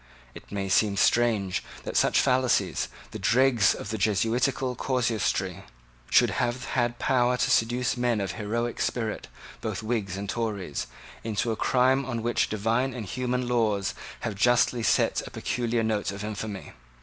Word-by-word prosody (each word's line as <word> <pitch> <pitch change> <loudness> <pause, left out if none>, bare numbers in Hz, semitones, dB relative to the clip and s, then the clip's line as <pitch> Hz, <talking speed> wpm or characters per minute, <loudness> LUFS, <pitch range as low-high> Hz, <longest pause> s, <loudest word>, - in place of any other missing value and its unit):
It - - -13
may 100 -1 -2
seem 100 +1 +2
strange 110 -5 +2 0.2
that - - -6
such - - +4
fallacies, 130 -1 +2 0.2
the 110 - -6
dregs 115 +1 +4
of 105 - -6
the 110 - -3
Jesuitical 120 +6 +1
casuistry, 120 -4 -1 0.5
should - - +5
have 120 +1 -1
had 120 -1 0
power 125 -1 +2
to 125 - +1
seduce 120 +3 +2
men 120 -2 +1
of 95 -3 -2
heroic 115 +4 -3
spirit, 110 -3 -2 0.3
both - - -4
Whigs 105 -5 -2
and 100 +1 -5
Tories, 100 - -3 0.4
into 115 +1 -1
a - - -1
crime 130 +4 +2
on 120 -4 -4
which 120 +1 +1
divine 115 +5 0
and 115 -4 -5
human 125 +4 -2
laws 110 -5 +1 0.3
have 110 - -2
justly 120 +3 +3
set 115 - +2
a - - -7
peculiar 120 -3 -1
note 110 -3 0
of 100 +1 -7
infamy. 105 -1 -5
115 Hz, 155 wpm, -27 LUFS, 105-125 Hz, 0.5 s, should